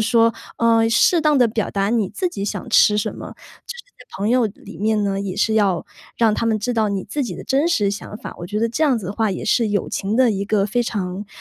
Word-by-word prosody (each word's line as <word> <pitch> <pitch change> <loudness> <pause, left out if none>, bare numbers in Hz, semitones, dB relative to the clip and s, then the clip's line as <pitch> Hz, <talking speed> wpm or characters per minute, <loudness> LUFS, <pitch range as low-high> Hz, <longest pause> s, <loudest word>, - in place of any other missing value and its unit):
说， 230 0 +4 0.2
呃， 230 -1 +3
适 280 +9 +4
当 300 -2 +3
地 245 - +5
表 220 -1 -2
达 200 0 0
你 225 -5 +1
自 350 - -2
己 200 - -6
想 210 - -4
吃 210 -2 +5
什 210 - -2
么， - - -8 0.4
就 485 - -6
是 485 - -10 0.2
在 - - -15
朋 205 +3 -1
友 250 -1 +3
里 205 -1 -11
面 215 0 +1
呢， 195 -1 -1
也 190 -2 -4
是 220 +2 +1
要 195 -6 +1 0.3
让 225 -2 +3
他 230 - -1
们 220 -1 +1
知 245 +4 -2
道 220 -2 +1
你 195 -2 -3
自 285 +8 -3
己 220 -9 -4
的 - - -9
真 280 +5 +1
实 210 -12 +1
想 205 +1 -6
法。 - - -9
我 175 - -6
觉 205 +4 -3
得 230 +1 0
这 275 - -2
样 285 -5 +3
子 205 - -9
的 195 - -4
话 220 -1 0
也 185 - -4
是 230 -3 +2
友 205 -1 -1
情 205 +2 -2
的 255 -2 +4
一 200 -1 -2
个 205 -1 +1
非 240 +4 0
常 200 -3 -4
215 Hz, 290 characters per minute, -20 LUFS, 200-235 Hz, 0.4 s, 地